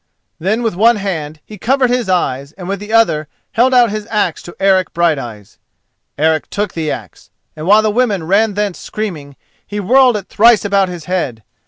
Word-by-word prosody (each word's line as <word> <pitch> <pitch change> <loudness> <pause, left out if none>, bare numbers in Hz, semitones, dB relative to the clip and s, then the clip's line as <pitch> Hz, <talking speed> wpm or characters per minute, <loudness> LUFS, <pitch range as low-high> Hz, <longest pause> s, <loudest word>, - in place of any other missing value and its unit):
Then 215 +8 -1
with 225 - 0
one 230 +5 +4
hand 160 -7 -4
he 210 -2 -12
covered 255 +2 +1
his 245 -5 -1
eyes 140 -6 -1
and 180 -2 -9
with 195 0 -3
the 210 +1 -8
other 190 -10 +2 0.2
held 245 +3 +3
out 245 -4 +4
his 215 0 -5
axe 210 -7 -1
to 175 - -11
Eric 190 -2 +2
Brighteyes. 135 - -2 0.6
Eric 155 +1 +1
took 205 -2 -3
the 160 -2 -3
axe, - - -7 0.3
and 155 +2 -6
while 210 +2 +5
the 215 - +1
women 210 -6 0
ran 200 +5 +2
thence 205 -3 -2
screaming, 160 -10 -6 0.3
he 205 - -6
whirled 250 +3 +4
it 200 - -8
thrice 230 0 +4
about 195 -2 +2
his 175 -3 -8
head. 150 -12 -3
195 Hz, 190 wpm, -16 LUFS, 160-215 Hz, 0.6 s, while